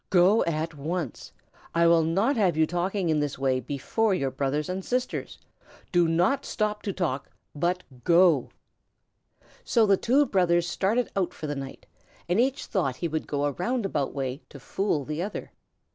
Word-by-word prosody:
"Go 190 +4 +5
at 160 0 -2
once. 155 0 -4 0.4
I 170 0 +4
will 170 0 +5
not 195 - +1
have 190 -8 +2
you 160 - +4
talking 175 +2 -1
in 155 -1 +2
this 145 -2 -2
way 130 -1 +1
before 145 - 0
your 135 -7 -1
brothers 140 +2 -1
and 185 +1 -3
sisters. 250 +4 -2 0.5
Do 175 -2 +4
not 175 +12 +2
stop 210 -1 -2
to 200 - -3
talk, 160 -8 -2 0.2
but 175 +5 -1 0.2
go!" 170 -4 +4 1.1
So 230 -3 +3
the 200 -2 +4
two 270 +8 +3
brothers 175 -5 +2
started 215 +7 0
out 190 -3 -1
for - - -6
the 145 - -2
night 135 -1 -8 0.4
and 175 +5 +1
each 265 +3 +1
thought 165 - -1
he 170 - -2
would 160 -1 -3
go 145 -1 -1
a 145 - +1
roundabout 195 - -1
way 135 +1 -4
to - - -11
fool 175 -8 -1
the 150 +3 -3
other. 200 +3 -5
175 Hz, 175 wpm, -26 LUFS, 150-195 Hz, 1.1 s, Go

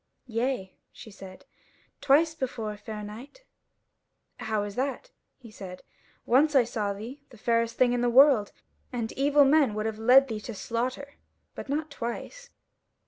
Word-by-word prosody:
"Yea," 230 -4 -2 0.2
she 220 - -13
said, 190 -1 -12 0.6
"twice 310 +4 +4
before, 235 -7 -4
fair 210 0 -8
knight." 245 - -11 0.9
"How 215 -2 -2
is 205 -1 -6
that?" 275 - -3 0.3
he 235 -4 -14
said; 185 -3 -10 0.4
"once 285 +5 +3
I 260 - +6
saw 215 -3 -2
thee, 230 +8 -8
the 240 - -16
fairest 230 +1 0
thing 245 -1 +3
in 245 - 0
the 245 - +2
world, 255 -4 +5 0.4
and 235 -3 -3
evil 285 +1 +3
men 275 -6 +3
would 215 0 -2
have 220 -1 -3
led 255 +4 +6
thee 220 -3 -4
to 230 0 -7
slaughter; 255 +7 -4 0.4
but - - -9
not 305 +2 -2
twice." 385 - -6
240 Hz, 155 wpm, -27 LUFS, 215-275 Hz, 0.9 s, I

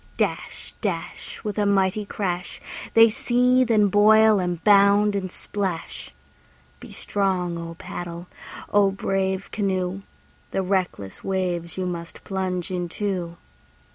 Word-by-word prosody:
Dash, - - -3
dash, - - -4
With 210 -1 -3
a 205 - +2
mighty 200 +1 +2
crash, 180 -3 -3 0.4
They 225 0 +9
seethe, 250 +1 +2
and 210 -3 +4
boil, 215 +1 +6
and 175 -2 -2
bound, 205 0 +5
and 185 -2 -3
splash. 190 -5 -4 0.7
Be - - -11
strong, 185 -4 -1
O 165 0 -7
paddle! 175 0 -7 0.5
be 205 -1 +5
brave, 190 0 -1
canoe! 190 -2 -1 0.5
The 195 - -1
reckless 180 - -2
waves 180 -3 -2
you 185 - -1
must 170 -2 -6
plunge 185 -2 -3
into. 180 -1 -3
190 Hz, 120 wpm, -24 LUFS, 180-205 Hz, 0.7 s, They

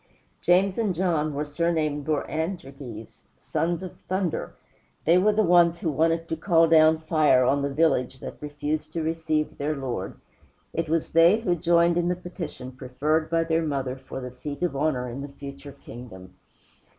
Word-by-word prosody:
James 185 +4 +3
and 205 -6 0
John 160 -4 0
were 145 +1 -3
surnamed 155 -2 -1
Boanerges 145 - -4 0.2
"sons 170 +2 -2
of 185 - -9
thunder." 185 -2 -2 0.5
They 170 +3 +5
were 210 +3 +4
the 215 +1 +2
ones 175 -2 +5
who 165 -2 -1
wanted 165 +3 +1
to 165 - -2
call 165 0 +3
down 160 -1 +6
fire 155 -5 +3
on 140 +3 +2
the 140 - -1
village 135 -4 +1
that - - -9
refused 150 +1 -3
to 165 - -2
receive 160 -1 -1
their 150 +2 -1
Lord. 125 -8 -4 0.6
It 165 -2 -2
was 165 0 0
they 170 +7 +5
who 180 -6 +1
joined 170 0 +3
in 175 - 0
the 180 - +1
petition 175 -7 -7
preferred 145 +5 -1
by 165 0 +2
their 165 0 +1
mother 135 -5 -2
for 135 0 -8
the 125 -1 -6
seat 145 +5 -6
of 175 -5 0
honor 135 -3 0
in 125 +3 -6
the 140 - -6
future 140 0 -10
kingdom. 95 -6 -10
155 Hz, 175 wpm, -25 LUFS, 140-170 Hz, 0.6 s, down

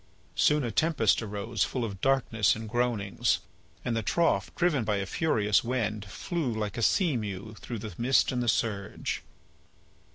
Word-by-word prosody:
Soon 150 -1 +3
a 120 - -2
tempest 145 -4 +2
arose 105 0 -2
full 125 -3 -2
of 100 -4 -7
darkness 125 -6 +2
and 110 0 -6
groanings, 115 -4 +1 0.5
and 120 - 0
the 115 - 0
trough, 170 +9 +1
driven 170 -8 +2
by 105 -1 0
a 100 -1 -1
furious 105 -4 +2
wind, 110 -4 -1
flew 145 - -3
like 105 -2 -3
a 115 - -3
sea 170 - +3
mew 105 -1 -4
through 120 - -5
the 105 -2 -6
mist 130 +2 +3
and 125 -1 -1
the 120 - -2
surge. 100 -2 -1
115 Hz, 165 wpm, -29 LUFS, 105-130 Hz, 0.5 s, Soon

